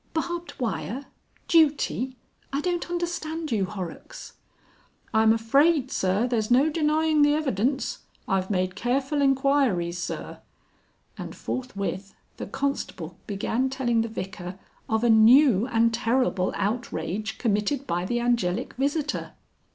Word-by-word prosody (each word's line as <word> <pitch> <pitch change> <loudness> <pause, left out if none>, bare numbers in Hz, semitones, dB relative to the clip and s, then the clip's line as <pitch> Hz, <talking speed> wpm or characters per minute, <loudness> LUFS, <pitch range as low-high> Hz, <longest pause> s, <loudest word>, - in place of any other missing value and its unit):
"Barbed 345 +2 -3
wire! 220 - -3 0.4
Duty! 285 -5 +2 0.4
I 275 - -1
don't 350 +2 -2
understand 335 -3 -3
you, 205 -4 +1
Horrocks." 190 - -8 0.8
"I'm 220 0 +5
afraid, 275 +5 +3
Sir, 190 +5 +1
there's 225 -4 -1
no 270 +6 +4
denying 310 0 +2
the 290 0 +5
evidence. 265 -2 -1 0.3
I've 190 -1 0
made 185 -2 0
careful 270 +6 0
enquiries, 270 -11 +2
Sir." - - -5 0.8
And - - -6
forthwith 200 -6 -4 0.2
the - - -6
constable 200 - -3
began 225 +6 -1
telling 240 -4 +1
the 225 - -1
Vicar 190 -4 -6 0.3
of 220 +1 +1
a 240 - +3
new 230 0 +6
and 230 -1 +2
terrible 230 -5 +1
outrage 215 -1 -3
committed 225 +6 0
by 175 -5 -1
the 240 +6 -1
Angelic 235 -7 0
visitor. 290 +3 -2
240 Hz, 120 wpm, -26 LUFS, 200-285 Hz, 0.8 s, new